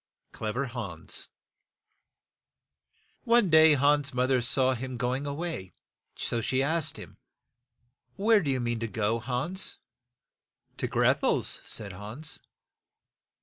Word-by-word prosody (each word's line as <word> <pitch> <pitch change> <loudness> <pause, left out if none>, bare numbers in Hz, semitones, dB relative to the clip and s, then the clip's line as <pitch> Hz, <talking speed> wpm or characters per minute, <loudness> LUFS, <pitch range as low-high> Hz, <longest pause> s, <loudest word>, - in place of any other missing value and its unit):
CLEVER 115 +5 -3
HANS 110 -10 -5 2.0
/^\NE 230 -6 +4
day 155 -1 +7
Hans's 145 0 +2
moth 130 +1 +1
er 130 -2 +3
saw 130 +2 +3
him 130 0 -5
go 125 +1 0
ing 140 +2 -3
a 140 - -2
way, 155 - -5 0.6
and 115 -1 -1
she 130 - 0
^^ - - +3
asked 155 0 0
him, - - -11 1.0
"Where 210 +1 +4
do 150 - -2
you 130 -1 +1
mean 120 -1 -1
to 115 - -2
go, 110 +2 0
Hans?" 135 +11 -3 1.0
"To - - -2
Greth - - +2
el's" - - +1
said 100 -2 -2
Hans. 110 +11 -6
130 Hz, 135 wpm, -28 LUFS, 115-150 Hz, 2.0 s, day